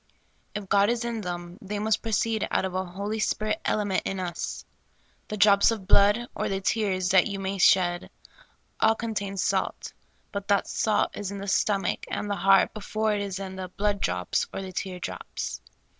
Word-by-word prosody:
If 205 -2 -4
God 200 +2 +4
is 235 0 0
in 230 -2 -2
them, 175 -1 -6
they 205 +1 -4
must 215 +1 +1
proceed 225 -1 0
out - - +1
of 190 - -4
a 185 0 0
Holy 200 +4 -4
Spirit 215 0 0
element 205 -3 +1
in 195 - -3
us. 175 -2 -4 0.6
The 215 - -4
drops 200 -1 +6
of 220 -4 -2
blood, 205 +4 +5
or - - -2
the 195 - -1
tears, 190 -2 0
that 185 -1 +5
you 200 -2 -4
may 195 0 -3
shed, 175 -1 +4 0.7
all 220 0 +4
contain 205 -4 -3
salt; - - -1 0.4
but 200 -1 -4
that 200 -1 +3
salt 215 -2 +1
is 205 -2 -4
in 200 - -5
the 200 0 -6
stomach 195 0 +1
and 205 - -3
the 205 - -1
heart 195 +1 +4
before 215 0 -1
it 205 - -1
is 195 -2 -3
in 190 -1 -6
the 185 -1 -4
blood 200 +2 -1
drops 90 0 0
or 195 - -5
the 185 -1 -7
tear 185 0 -4
drops. - - -5
200 Hz, 190 wpm, -27 LUFS, 190-210 Hz, 0.7 s, drops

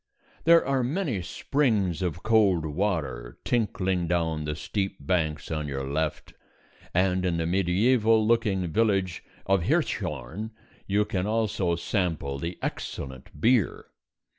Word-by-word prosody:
There 165 0 +6
are 135 -1 +1
many 135 - -1
springs 105 - 0
of 85 -2 -2
cold 105 -7 +3
water 75 -8 -2
tinkling 95 -6 0
down 80 -3 0
the 75 0 -2
steep 95 +3 -3
banks 75 0 -1
on 75 -1 -2
your 70 -1 -3
left, 75 +3 -2 0.6
and 90 +1 +2
in 90 -2 +1
the 85 - 0
mediæval 105 +6 +3
looking 110 -5 +2
village 95 -4 +1 0.2
of 95 -1 +3
Hirschhorn 75 - -1 0.4
you 105 +1 +2
can 95 -1 -2
also 105 -5 +1
sample 85 -6 -1
the 85 +4 -4
excellent 65 -1 -5
beer. 115 -4 +2
90 Hz, 125 wpm, -27 LUFS, 80-110 Hz, 0.6 s, There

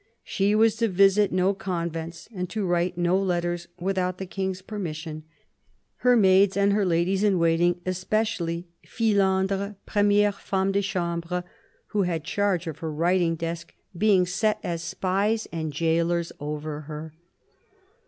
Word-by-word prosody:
She 200 +2 +1
was 220 0 +4
to 230 0 +2
visit 195 +1 +4
no 185 +2 +2
convents 170 -3 -4
and 180 -3 -4
to 215 -3 -2
write 175 0 0
no 175 +1 +2
letters 175 -2 -1
without 185 0 -1
the 190 - -5
King's 190 0 -4
permission, 160 -6 -6 0.7
her 250 0 +4
maids 195 -1 +5
and 200 0 +3
her 205 -2 +2
ladies 180 +3 +1
in 200 -3 +3
waiting, 170 +1 +2
especially 185 -2 -1
" - - -48
Fillandre, 200 -2 +1
premiere 205 0 +3
femme 195 -1 -1
de 200 +1 +1
chambre," 180 -2 -2 0.5
who 210 - 0
had 170 -4 -1
charge 190 0 0
of 160 -2 -6
her 160 -1 -4
writing 170 +2 +1
desk, 165 +1 -5 0.2
being 190 -1 +4
set 210 +4 0
as 170 -1 -3
spies 195 +5 -1
and 160 -2 -3
gaolers 165 +2 0
over 150 0 -4
her. 155 0 -7
185 Hz, 145 wpm, -25 LUFS, 170-200 Hz, 0.7 s, maids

